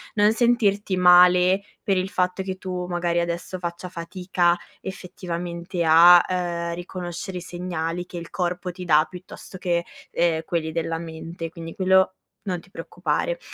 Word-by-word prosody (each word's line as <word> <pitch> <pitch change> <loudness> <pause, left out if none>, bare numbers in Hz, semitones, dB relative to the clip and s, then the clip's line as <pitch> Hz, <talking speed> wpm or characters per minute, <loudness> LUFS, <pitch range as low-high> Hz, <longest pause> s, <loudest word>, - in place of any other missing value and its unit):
non 210 +1 +4
sentirti 210 -5 +2
male 180 +1 +6 0.2
per 195 -3 +1
il 185 +1 -1
fatto 180 0 0
che 190 0 -4
tu 180 -1 -4
magari 175 -1 0
adesso 170 +2 -3
faccia 175 +1 -5
fatica 175 0 0 0.2
effettivamente 175 -2 -5
a, 170 +2 +9
uhm, 170 -2 -2
riconoscere 175 +1 -6
i - - -5
segnali 175 -1 -4
che 175 - -8
il 170 - -8
corpo 180 0 -2
ti 180 +1 -9
dà, 155 -2 +5
piuttosto 185 0 -11
che, 170 -2 0 0.3
ehm, 165 -2 +1
quelli 165 -3 -2
della 165 0 -2
mente 165 0 -7
quindi, 165 0 -9
quello 190 0 +3 0.3
non 180 -3 -2
ti 190 +3 -20
preoccupare. - - -2
180 Hz, 150 wpm, -24 LUFS, 170-185 Hz, 0.3 s, a